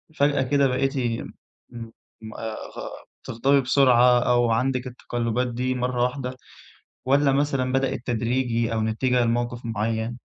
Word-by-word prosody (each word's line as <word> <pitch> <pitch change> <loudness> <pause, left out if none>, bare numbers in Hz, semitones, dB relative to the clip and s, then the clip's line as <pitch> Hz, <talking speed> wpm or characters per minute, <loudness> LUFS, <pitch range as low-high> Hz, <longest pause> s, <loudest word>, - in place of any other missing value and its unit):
فجأة 145 -1 +2
كده 140 +1 +2
بقيتِ 135 +2 -1 0.7
م 115 -1 -12
آآ 110 -1 -5 0.7
تغضبي 135 +4 +2
بسرعة 125 -2 +4
أو 120 -1 +2
عندِك 130 +2 0
التقلبات 120 0 -2
دي 125 +2 -2
مرة 125 0 -1
واحدة 125 0 -3 0.7
والّا 140 +1 +3
مثلًا 135 -2 0
بدئت 135 -2 -1
تدريجي 120 -1 0
أو 110 - 0
نتيجة 120 +3 +1
لموقف 120 +1 -1
معين؟ 115 +1 -2
125 Hz, 120 wpm, -24 LUFS, 115-130 Hz, 0.7 s, بسرعة